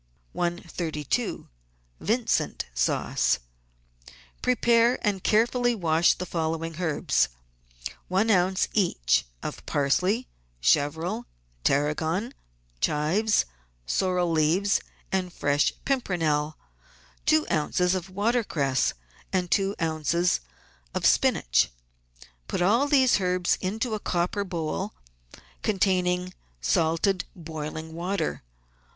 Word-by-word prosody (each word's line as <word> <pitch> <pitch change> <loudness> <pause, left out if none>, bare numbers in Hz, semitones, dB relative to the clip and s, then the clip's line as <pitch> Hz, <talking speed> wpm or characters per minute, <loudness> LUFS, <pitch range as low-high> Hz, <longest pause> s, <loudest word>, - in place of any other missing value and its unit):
132— 170 - -2 0.5
VINCENT 230 +1 0
SAUCE 60 +1 +1 1.0
Prepare 240 -1 +3
and 200 -3 0
carefully 240 +2 +3
wash 165 -3 +3
the 180 - -5
following 165 -1 -2
herbs: 160 -5 +1 0.4
— - - -9
One 200 +5 +2
oz. 185 0 +3
each 170 - +2 0.2
of - - -5
parsley, 185 - +1 0.3
chervil, 160 - +1 0.4
tarragon, 160 - 0 0.5
chives, 160 - +2 0.4
sorrel 180 - +1
leaves, 165 +6 +2 0.3
and 185 -2 -1
fresh 145 -2 +1
pimpernel, 160 - 0 0.7
two 155 -1 +4
oz. 155 +3 0
of 185 -1 -3
water 225 +6 +1
cress 135 -8 0 0.4
and 180 -2 -1
two 195 0 +2
oz. 165 +2 +1 0.6
of - - -1
spinach. - - +3 0.8
Put - - -1
all 230 +10 +3
these 260 -7 +4
herbs 180 -1 +2
into 220 +5 -2
a 215 - -1
copper 180 +2 -1
bowl 160 - -3 0.7
containing 185 -3 +1 0.3
salted, 165 - +1
boiling 160 -1 -6
water. 175 0 -2
180 Hz, 95 wpm, -26 LUFS, 155-200 Hz, 1.0 s, two